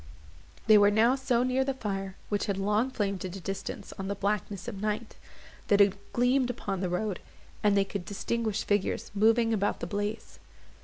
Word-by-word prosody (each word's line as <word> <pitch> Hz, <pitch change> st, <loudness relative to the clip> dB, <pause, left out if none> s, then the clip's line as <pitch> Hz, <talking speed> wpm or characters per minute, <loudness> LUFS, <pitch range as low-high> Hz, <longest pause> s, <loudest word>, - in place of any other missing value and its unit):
They 215 Hz, -1 st, +7 dB
were 205 Hz, 0 st, +6 dB
now 220 Hz, +4 st, +4 dB
so 260 Hz, -3 st, +1 dB
near 255 Hz, +1 st, +2 dB
the 270 Hz, 0 st, -2 dB
fire, 195 Hz, -5 st, -4 dB
which 205 Hz, +1 st, -1 dB
had 200 Hz, -2 st, -1 dB
long 210 Hz, +5 st, +1 dB
flamed 200 Hz, -6 st, -2 dB
at 185 Hz, 0 st, -5 dB
a -, -, -6 dB
distance 195 Hz, +2 st, -5 dB
on 190 Hz, -, -3 dB
the 200 Hz, -, -2 dB
blackness 200 Hz, 0 st, -2 dB
of 200 Hz, -5 st, -5 dB
night, 215 Hz, +1 st, -2 dB, 0.5 s
that 205 Hz, -, +4 dB
it 200 Hz, 0 st, +2 dB
gleamed 250 Hz, +1 st, +2 dB
upon 200 Hz, -5 st, -3 dB
the 185 Hz, -1 st, -1 dB
road, 185 Hz, +2 st, -2 dB, 0.4 s
and 205 Hz, -1 st, +3 dB
they 195 Hz, -, +3 dB
could 195 Hz, -1 st, -5 dB
distinguish 220 Hz, +2 st, -2 dB
figures 205 Hz, -2 st, -1 dB
moving 225 Hz, +2 st, +3 dB
about 205 Hz, -1 st, 0 dB
the -, -, -3 dB
blaze. 205 Hz, +2 st, -4 dB
205 Hz, 190 wpm, -29 LUFS, 195-230 Hz, 0.5 s, They